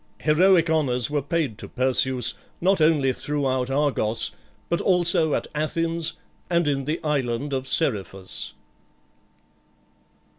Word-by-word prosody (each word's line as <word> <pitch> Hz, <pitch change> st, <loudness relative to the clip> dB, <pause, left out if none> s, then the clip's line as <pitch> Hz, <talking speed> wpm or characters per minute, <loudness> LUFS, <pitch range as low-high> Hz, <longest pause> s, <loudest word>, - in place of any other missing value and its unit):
Heroic 170 Hz, +2 st, +4 dB
honours 135 Hz, -6 st, +1 dB
were 145 Hz, -1 st, 0 dB
paid 145 Hz, -, -2 dB
to -, -, -7 dB
Perseus, 130 Hz, -1 st, +1 dB, 0.3 s
not 185 Hz, 0 st, +2 dB
only 150 Hz, -4 st, +3 dB
throughout 130 Hz, -3 st, -1 dB
Argos, 135 Hz, -6 st, +1 dB, 0.4 s
but 170 Hz, -, -1 dB
also 170 Hz, -4 st, +3 dB
at -, -, -2 dB
Athens 165 Hz, +2 st, -1 dB, 0.4 s
and 170 Hz, -2 st, +1 dB
in 135 Hz, -2 st, -1 dB
the 155 Hz, +4 st, -2 dB
island 140 Hz, -2 st, -1 dB
of 130 Hz, 0 st, -2 dB
Seriphus. 100 Hz, -, -2 dB
145 Hz, 115 wpm, -24 LUFS, 130-165 Hz, 0.4 s, Heroic